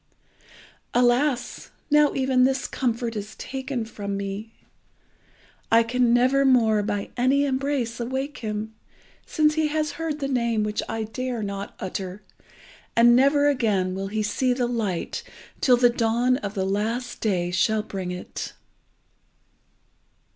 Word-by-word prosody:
Alas! 245 +1 +1 0.2
now 300 0 +4
even 260 -1 +3
this 265 +1 +1
comfort 235 -2 -2
is 210 +1 -6
taken 265 -3 -4
from 200 -3 -5
me. 200 +3 -5 1.2
I 230 +1 +6
can 245 +1 +1
never 255 +3 +4
more 230 -5 +4
by 205 -1 -3
any 270 +3 +3
embrace 265 -3 -1
awake 265 +4 -3
him, 215 0 -4 0.5
since 305 -1 +2
he 315 0 +1
has 305 0 -1
heard 315 -2 -2
the 275 - -2
name 235 -5 +1
which 210 0 -1
I 225 0 -2
dare 240 +1 -4
not 200 0 -5
utter, 190 +1 -5 0.7
and 240 +1 +6
never 280 +3 +4
again 210 -9 +1
will 195 +1 -3
he 215 +2 -2
see 250 +5 +1
the 245 0 0
light 220 -7 -2 0.4
till 250 -2 +5
the 245 0 +5
dawn 240 +2 +2
of 205 -4 -6
the 190 -1 0
last 225 +5 -2
day 180 -5 0
shall 215 +4 +1
bring 190 -3 -5
it." 180 0 -6
235 Hz, 140 wpm, -24 LUFS, 210-260 Hz, 1.2 s, I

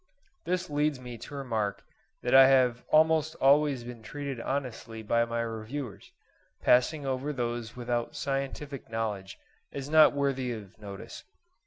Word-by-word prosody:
This 180 +1 -1
leads 150 -2 0
me 125 -1 -8
to 145 +6 -9
remark 110 -7 -2 0.4
that 125 - 0
I 135 0 +10
have 125 -3 +3
almost 160 0 +4
always 140 -2 +3
been 120 -1 -9
treated 140 0 -5
honestly 115 -4 -4
by 115 +2 +2
my 115 0 -2
reviewers, 115 0 -6 0.5
passing 140 +4 +3
over 135 +2 -1
those 120 -3 -3
without 120 +2 -2
scientific 140 -1 -4
knowledge 105 -4 -3 0.3
as 140 +1 -6
not 155 -1 +7
worthy 135 -3 0
of 105 -4 -9
notice. 100 -2 -9
130 Hz, 140 wpm, -29 LUFS, 115-145 Hz, 0.5 s, I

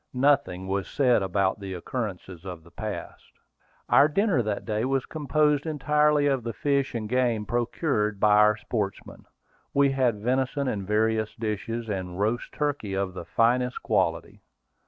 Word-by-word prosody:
Nothing 130 -10 +2
was 95 0 -1
said 125 -6 +2
about 95 +1 0
the 95 -2 -6
occurrences 95 -3 -5
of 90 -4 -8
the 85 - -18
past. 110 -2 -7 0.5
Our 145 - +6
dinner 185 - +2
that 105 -2 -3
day 110 -1 -1
was 135 0 0
composed 150 0 +1
entirely 150 0 +2
of 135 -3 +2
the 115 0 -4
fish 140 +3 0
and 110 -2 -3
game 120 -3 +1
procured 115 - -1
by 105 0 +5
our 105 0 +5
sportsmen. 105 -3 -4 0.5
We 140 0 +4
had 130 -4 +2
venison 130 +4 0
in 100 -6 -3
various 110 0 +1
dishes, 115 +1 -3
and 95 -3 -4
roast 110 +4 -1
turkey 145 -10 -2
of 95 -1 -2
the 90 - -7
finest 125 +2 +1
quality. - - -1
115 Hz, 155 wpm, -26 LUFS, 100-135 Hz, 0.5 s, Our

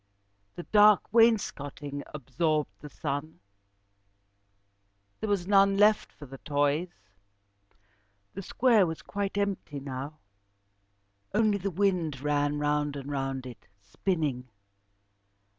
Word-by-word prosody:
The 175 - -7
dark 210 0 +4
wainscoting 145 -11 +1
absorbed 150 +2 -1
the 150 - -10
sun. 145 +3 -5 1.8
There 220 - -3
was 200 -4 0
none 195 0 +4
left 210 +1 +3
for 135 -3 -12
toys. 145 +4 0 1.4
The 195 - -6
square 225 -1 +3
was 160 0 -6
quite 200 0 -4
empty 200 -8 -2
now. 135 +2 -6 1.2
Only 210 -2 +2
the 195 +2 -2
wind 180 -6 0
ran 145 +1 0
round 150 0 0
and 140 0 -6
round 135 -2 -3
it, 125 -2 -11
spinning. 130 - -3
155 Hz, 105 wpm, -28 LUFS, 145-200 Hz, 1.8 s, dark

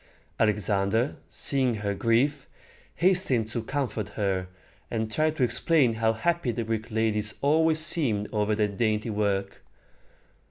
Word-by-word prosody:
Alexander, 105 +3 0
seeing 130 -4 +1
her 100 -1 -3
grief, 130 +7 0 0.5
hastened 170 - +2
to 115 +1 -3
comfort 115 -4 -3
her, 95 -3 -2 0.4
and 110 -1 -3
tried 155 +5 +1
to 135 - 0
explain 130 0 +2
how 110 0 +1
happy 170 +5 -1
the 115 0 -3
Greek 110 0 -4
ladies 110 -1 0
always 160 +2 +3
seemed 135 -10 +4
over 105 0 0
their 105 -1 +1
dainty 110 +2 -1
work. 100 -2 -2
110 Hz, 130 wpm, -26 LUFS, 105-140 Hz, 0.5 s, seemed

